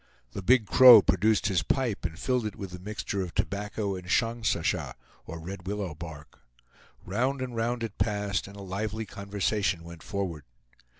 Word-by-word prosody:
The 100 - -5
Big 120 +4 +4
Crow 120 -2 +9
produced 100 +3 +2
his 95 -3 +2
pipe 120 - -1
and 80 0 -4
filled 125 -1 0
it 105 - -7
with 95 -2 -7
the 90 - -8
mixture 100 0 -4
of 90 -3 -6
tobacco 100 0 -2
and 90 -1 -8
shongsasha, 115 +3 0 0.3
or 85 +1 -6
red 90 +2 -8
willow 100 -4 -3
bark. 80 -2 -10 0.7
Round 125 +8 0
and 130 -2 -4
round 115 +1 -1
it 115 - -6
passed, 100 -2 -1
and 100 - -12
a 100 - -8
lively 105 +3 -3
conversation 100 -2 -1
went 85 -1 -11
forward. 90 -7 -4
100 Hz, 170 wpm, -28 LUFS, 90-110 Hz, 0.7 s, Crow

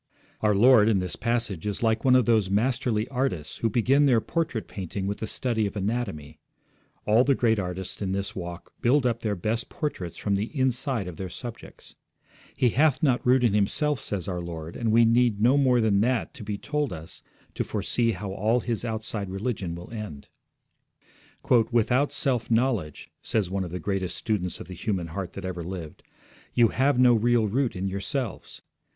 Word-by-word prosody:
Our 105 -1 +3
Lord 115 0 +6
in 105 - +3
this 90 -1 -3
passage 115 -6 -1
is 105 +2 -3
like 110 0 +1
one 130 -1 +5
of 125 -3 +4
those 110 -5 +3
masterly 110 +1 0
artists 125 - -2
who 115 - 0
begin 135 +6 +3
their 120 -4 +4
portrait 160 -3 -2
painting 95 0 -5
with 100 +1 -3
the 110 - -3
study 110 -2 -1
of 100 - -8
anatomy. 100 -8 -3 0.7
All 110 +4 +5
the 140 0 +3
great 115 -3 +2
artists 90 +1 -5
in 95 -2 -1
this 100 0 -3
walk 85 -1 -7
build 130 +3 +3
up 120 -2 +1
their 105 -3 -1
best 110 +6 -2
portraits 95 - -4
from 100 - -1
the 105 +9 -2
inside 130 -4 0
of 90 - -7
their 95 -1 -5
subjects. 120 +5 -9 0.6
He 125 - +3
hath 145 +5 +2
not 130 -5 +2
root 125 0 +4
in 115 -4 +3
himself, 130 +8 +1
says 100 -4 -4
our 90 -2 -3
Lord, 85 -1 -7
and 115 -2 0
we 115 +1 +6
need 115 -2 +3
no 120 +5 +4
more 130 -3 +4
than 105 -3 +3
that 125 +1 0
to 130 - -9
be 105 0 -3
told 150 +4 -2
us 80 -1 -7 0.3
to - - -1
foresee 115 -2 0
how 95 +1 -5
all 110 +5 +1
his 115 -1 -2
outside 110 -3 -3
religion 95 -3 -3
will 85 +4 -10
end. 105 -11 -7 1.4
'Without 125 +4 +2
self 125 -4 0
knowledge,' 115 - 0
says 100 -5 -1
one 95 0 -1
of 90 - -5
the 90 - -4
greatest 95 -4 -2
students 100 -6 -2
of - - -9
the 95 - -8
human 90 -1 -3
heart 90 +2 -5
that 95 - -7
ever 90 -2 -4
lived, 85 -3 -7 0.5
'you 120 -2 +5
have 135 +3 +2
no 125 -1 +6
real 115 0 +3
root 125 +4 0
in 95 +1 -2
yourselves. 100 +5 -4
110 Hz, 190 wpm, -26 LUFS, 95-125 Hz, 1.4 s, Lord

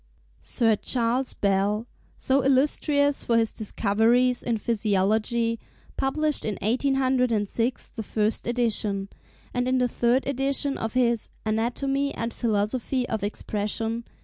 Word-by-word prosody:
Sir 225 -3 +2
Charles 245 +3 +1
Bell, 200 +2 0 0.3
so 270 +1 +1
illustrious 285 +1 +2
for 230 - +2
his 225 -1 +1
discoveries 230 +4 +1
in 235 -2 -1
physiology, 220 +2 0 0.4
published 300 +2 0
in 210 - -2
1806 250 -1 0
the 225 - -7
first 215 +1 -1
edition, 215 -5 0 0.4
and 245 0 0
in 260 0 +2
the 250 -1 +2
third 245 +2 +1
edition 275 +1 +1
of 225 -1 -4
his 235 -3 +1 0.2
'Anatomy 270 +6 -1
and 230 0 -3
Philosophy 235 +3 -1
of 220 -2 -2
Expression. 215 +2 -2
235 Hz, 120 wpm, -25 LUFS, 215-260 Hz, 0.4 s, Sir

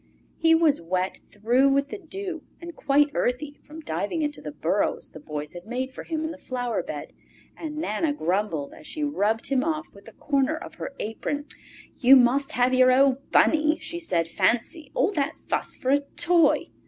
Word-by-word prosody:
He 325 0 +4
was 325 - +3
wet 185 +2 -2
through 240 +6 +3
with 280 +1 +1
the 425 - -6
dew 370 -1 -6 0.2
and 340 -1 -9
quite 290 0 +2
earthy 285 +4 -2
from 310 +2 -11
diving 205 - -2
into 295 0 -3
the 150 - -6
burrows 165 +7 -1
the 155 - -10
Boy 150 -1 -5
had 175 +3 -10
made 255 +3 -3
for - - -9
him 320 -1 -3
in 320 - -2
the 295 - -10
flower 245 -3 -2
bed, - - -7 0.4
and 305 -2 -6
Nana 310 0 0
grumbled 180 - -1
as - - -13
she 305 - -4
rubbed 225 -6 0
him 265 -2 +2
off 315 0 -3
with 200 +1 -16
a 225 - -12
corner 280 +1 0
of - - -9
her 275 - -5
apron. 285 +7 -3
Spring - - -18 0.2
Time - - -27
"You 260 +1 +8
must 265 +2 +4
have 250 +1 +2
your 255 0 +6
old 270 +1 +3
Bunny!" 310 0 +4
she 325 +2 -6
said. 170 - 0
"Fancy 235 - 0
all 400 - +2
that 315 -3 -1
fuss - - -1
for 260 - -1
a 285 - +5
toy!" 335 +4 +3
275 Hz, 200 wpm, -25 LUFS, 225-310 Hz, 0.4 s, You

